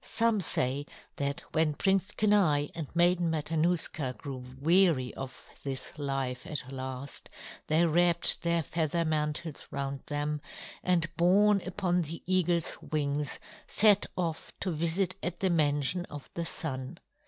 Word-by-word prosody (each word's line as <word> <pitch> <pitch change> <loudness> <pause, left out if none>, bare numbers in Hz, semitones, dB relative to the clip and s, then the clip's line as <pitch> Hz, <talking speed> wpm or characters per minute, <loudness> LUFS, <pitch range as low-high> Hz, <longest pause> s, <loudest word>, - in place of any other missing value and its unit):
Some 230 -3 +1
say 140 -3 0 0.3
that 140 0 -2
when 155 -2 +2
Prince 195 +4 +1
Kenai 190 -10 +2
and 160 -3 -5
Maiden 175 0 +3
Matanuska 160 -3 0
grew 135 -4 -7 0.2
weary 165 -4 +3
of 135 0 -9 0.2
this 135 -2 -5
life 135 -3 -3
at 140 -4 +1
last, 130 +1 -7 0.4
they 160 +3 +3
wrapped 170 +1 +5
their 170 -1 +1
feather 165 +2 -1
mantles 155 0 -2
round 140 0 -4
them, 145 0 -2 0.4
and 175 -2 +2
borne 195 +4 +4
upon 180 -1 0
the 165 +1 -6
eagle's 175 -2 +1
wings, 145 -1 -2 0.3
set 205 -2 +5
off 165 -3 -3
to 185 - -1
visit 170 +4 +1
at 175 0 -4
the 190 -2 +1
mansion 150 +2 +2
of 145 -5 -10
the 170 - -3
Sun. 135 -2 -4
160 Hz, 135 wpm, -29 LUFS, 145-175 Hz, 0.4 s, wrapped